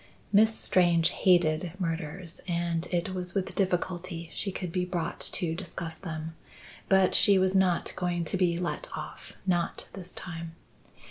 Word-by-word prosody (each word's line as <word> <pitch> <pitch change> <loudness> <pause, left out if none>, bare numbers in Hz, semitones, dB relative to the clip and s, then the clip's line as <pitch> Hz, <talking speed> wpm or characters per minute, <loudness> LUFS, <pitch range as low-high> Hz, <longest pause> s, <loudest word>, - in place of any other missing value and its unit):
Miss 220 +2 +5
Strange 170 -2 +4
hated 170 -2 +2
murders 165 0 -3
and 170 -1 -1
it 180 +1 -1
was 180 -1 -3
with 195 -2 -1
difficulty 180 -2 -2
she 200 - -2
could 180 -2 -5
be 180 +1 0
brought 175 -2 -3
to 170 -4 +3
discuss 170 -2 -5
them. 160 -2 -6 0.5
But 190 -1 +4
she 200 -2 +6
was 190 0 +2
not 190 -3 +2
going 175 -2 -1
to 160 - -2
be 180 -2 +2
let 175 0 -3
off; - - -8
not 175 -3 -1
this 185 -2 -6
time. 165 -2 -7
175 Hz, 150 wpm, -28 LUFS, 170-185 Hz, 0.5 s, she